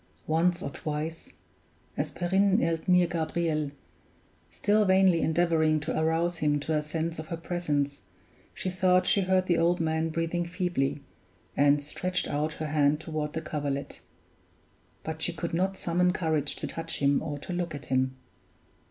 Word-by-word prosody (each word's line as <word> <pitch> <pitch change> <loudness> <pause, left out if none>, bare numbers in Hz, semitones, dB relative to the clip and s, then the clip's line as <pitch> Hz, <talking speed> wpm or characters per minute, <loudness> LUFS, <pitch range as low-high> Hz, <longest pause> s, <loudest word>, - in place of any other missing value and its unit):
Once 170 +3 +1
or - - -4
twice, 155 +3 -5 0.7
as - - -1
Perrine 190 +2 +2
knelt 165 -1 0
near 180 -1 +5
Gabriel, 160 -2 -1 0.8
still 205 - +2
vainly 190 -3 +4
endeavoring 160 -1 +2
to 150 +2 -3
arouse 165 +2 +1
him 150 -2 +1
to 155 +2 -1
a 150 - +2
sense 160 +2 -3
of 155 - -6
her 170 - -4
presence, 150 -5 -2 0.5
she - - -6
thought 185 0 +3
she 200 - +3
heard 185 0 +2
the 175 -2 +2
old 175 +2 +3
man 160 0 0
breathing 165 +2 -1
feebly, 170 -6 -1 0.5
and 145 0 +4
stretched 180 +5 -1
out 150 +2 -1
her 155 - -5
hand 150 -1 +2
toward 155 -2 -4
the 160 - -2
coverlet; 145 -3 -4 1.0
but 160 0 -5
she 175 - +1
could 170 0 -4
not 190 +3 0
summon 180 +1 +2
courage 160 -5 0
to - - -5
touch 165 - -5
him 140 0 +2
or 150 -2 -4
to 160 +5 -6
look 175 -3 -2
at 145 - -8
him. 130 0 0
165 Hz, 160 wpm, -28 LUFS, 150-175 Hz, 1.0 s, near